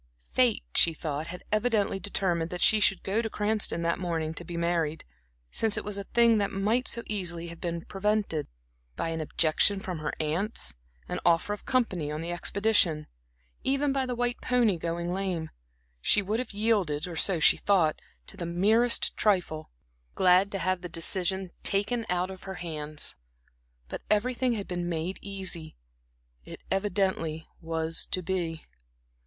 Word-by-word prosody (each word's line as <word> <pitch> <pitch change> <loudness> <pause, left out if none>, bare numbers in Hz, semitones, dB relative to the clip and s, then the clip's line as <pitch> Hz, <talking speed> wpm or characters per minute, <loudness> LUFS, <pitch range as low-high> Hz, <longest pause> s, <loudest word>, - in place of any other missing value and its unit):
Fate, - - +3
she 165 -1 +4
thought, 155 0 -3
had 180 +1 -7
evidently 215 -3 +1
determined 175 -4 -1
that 180 0 -5
she 215 - +5
should 195 -2 +2
go 205 +4 +1
to 225 - -3
Cranston 210 -5 +1
that 170 +1 +1
morning 165 -3 -2
to 170 - -6
be 175 -1 -6
married, 170 -2 0 0.5
since 220 -2 +2
it - - -1
was 205 -1 -1
a 200 - -5
thing 235 -1 +4
that 200 - +1
might 215 +6 +1
so 235 - -1
easily 175 -5 -3
have 170 0 -10
been 170 -1 -3
prevented 205 -5 0 0.5
by 165 - -2
an 165 -1 -2
objection 160 +6 +2
from 185 -4 -5
her 155 -1 -2
aunts, 165 +8 0 0.3
an - - -3
offer 170 +4 +3
of 205 - -9
company 190 - +1
on 150 - -3
the 170 +2 -4
expedition, 175 -4 +2 0.6
even 275 +1 +1
by 265 -1 0
the 250 - -2
white 245 0 -1
pony 240 -6 +3
going 170 +1 -3
lame; 180 -4 -2 0.5
she 205 - +4
would 210 +4 -1
have 255 - -4
yielded, 200 -8 +1
or 175 - -6
so 180 +1 +3
she 155 - +6
thought, 175 -7 +2 0.2
to - - -7
the 190 - -5
merest 215 +8 +3
trifle, 180 -7 +1 0.5
glad 185 +2 +5
to 195 - -2
have 185 -1 0
the 180 - -6
decision 185 +2 -1
taken 215 +4 0
out 180 +1 0
of 190 0 -11
her 190 0 -5
hands. 155 -4 -3 0.7
But - - -6
everything 245 +3 +2
had 205 -3 -4
been 175 -1 -3
made 170 +3 -3
easy; 190 -5 -4 0.7
it - - -9
evidently 190 -5 0
was 165 0 -2
to 185 - -1
be. 165 -3 -2
185 Hz, 170 wpm, -28 LUFS, 165-210 Hz, 0.7 s, she